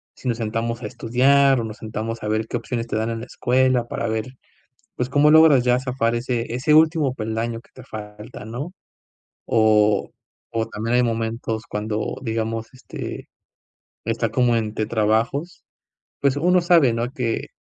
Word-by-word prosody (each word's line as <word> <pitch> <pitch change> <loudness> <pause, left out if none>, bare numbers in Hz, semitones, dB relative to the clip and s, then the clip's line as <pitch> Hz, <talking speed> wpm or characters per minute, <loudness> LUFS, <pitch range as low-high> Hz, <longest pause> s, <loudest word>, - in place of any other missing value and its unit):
si 130 - -8
nos 115 -1 0
sentamos 115 +1 -2
a - - -5
estudiar 130 +2 +3
o - - -3
nos 110 +1 -6
sentamos 110 +1 -5
a - - -3
ver 110 +1 0
qué 120 - -2
opciones 115 0 -4
te 110 - -2
dan 110 +1 -1
en 115 - -3
la - - -6
escuela 125 -1 +1
para 115 -1 -3
ver, 110 0 -1 0.7
pues, 125 +1 -2
cómo 150 +2 +4
logras 155 -5 +7
ya 125 0 +3
zafar 125 -3 -1
ese 120 -1 -2
ese 145 +5 +1
último 155 -4 +4
peldaño 115 +1 -3
que - - -27
te 130 - -12
falta, 105 -1 -9
no?". 130 +10 -6 0.8
O 105 -2 +3 0.4
o 115 -1 -1
también 115 +3 -2
hay 125 - +4
momentos 115 -1 -2
cuando, 105 +1 -3
digamos, 115 -1 -2
este, 125 - -8 0.8
está 115 0 -1
como 120 0 +2
entre 110 -1 -2
trabajos, 115 +9 0 0.6
pues 140 -1 +2
uno 180 +4 +3
sabe, 165 -9 +4
¿no?, 120 +2 -2
que 120 -4 -3
115 Hz, 165 wpm, -22 LUFS, 110-130 Hz, 0.8 s, logras